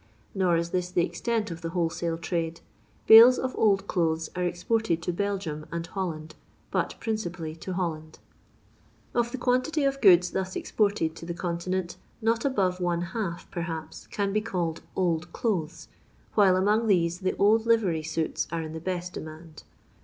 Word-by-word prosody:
Nor 185 -3 +2
is 170 0 -2
this 180 -1 -1
the 175 -1 +2
extent 215 +4 -2
of 165 0 -7
the 165 - -3
wholesale 165 0 -1
trade. 165 0 -3 0.4
Bales 230 +3 +10
of 260 0 -2
old 200 -2 +3
clothes 165 -4 0
are 180 - -2
exported 180 +1 0
to 175 - -1
Belgium 185 -6 -3
and 170 0 -3
Holland, 165 -4 -5 0.4
but - - -1
principally 180 -8 -3
to 185 +3 -6
Holland. 160 -4 -3 1.0
Of 240 0 +1
the 260 - -4
quantity 255 +5 +1
of 275 0 0
gocds 180 -3 +6
thus 190 0 -3
exported 200 -7 0
to 165 - -9
the 170 - -4
Continent 175 +1 -3 0.2
not 230 +1 +1
above 190 -9 +1
one 175 -1 0
half, 190 -7 -3
perhaps, 165 -2 -5
can 200 -1 -2
bo 215 - +2
called 175 -6 -2
old 175 -2 0
clothes, 180 -9 -2 0.5
while 195 -3 +5
among 210 +4 +2
these 175 -3 +2
the 185 -1 -1
old 220 +3 +3
livery 205 -9 +2
suits 160 +1 -2
are 165 -1 -2
in 155 0 -7
the 160 - -5
best 180 +1 -4
demand. 155 0 -9
180 Hz, 165 wpm, -27 LUFS, 165-210 Hz, 1.0 s, Bales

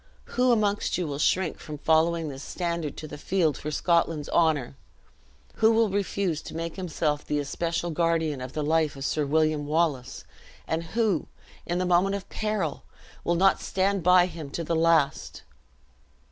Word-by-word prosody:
Who 250 0 +4
amongst 210 -3 +1
you 180 - -1
will 145 -2 -4
shrink 180 +2 +1
from 150 -2 -7
following 160 +2 +2
this 135 -2 -7
standard 170 -3 -3
to 155 - -6
the 150 - -9
field 170 -5 +1
for 150 - -5
Scotland's 165 -1 +1
honor? 155 -7 +1 0.8
Who 220 0 +5
will 225 -2 +3
refuse 195 -4 -1
to - - -9
make 165 0 -4
himself 155 -5 -2
the 150 - -2
especial 165 +4 -2
guardian 160 -4 0
of 130 0 -7
the 150 - -2
life 155 -1 +1
of 135 0 -5
Sir 150 -1 0
William 155 0 +1
Wallace? 150 -5 -1 0.4
and 160 +1 -1
who, 215 -8 +1 0.4
in 175 - -1
the 185 - 0
moment 180 +3 +3
of 200 - -6
peril, 210 -8 -2 0.4
will 170 - +1
not 190 +3 +3
stand 195 0 0
by 180 +1 +6
him 160 -5 -7
to 170 - -4
the 165 +1 -1
last? 160 -3 +1
165 Hz, 170 wpm, -26 LUFS, 150-180 Hz, 0.8 s, by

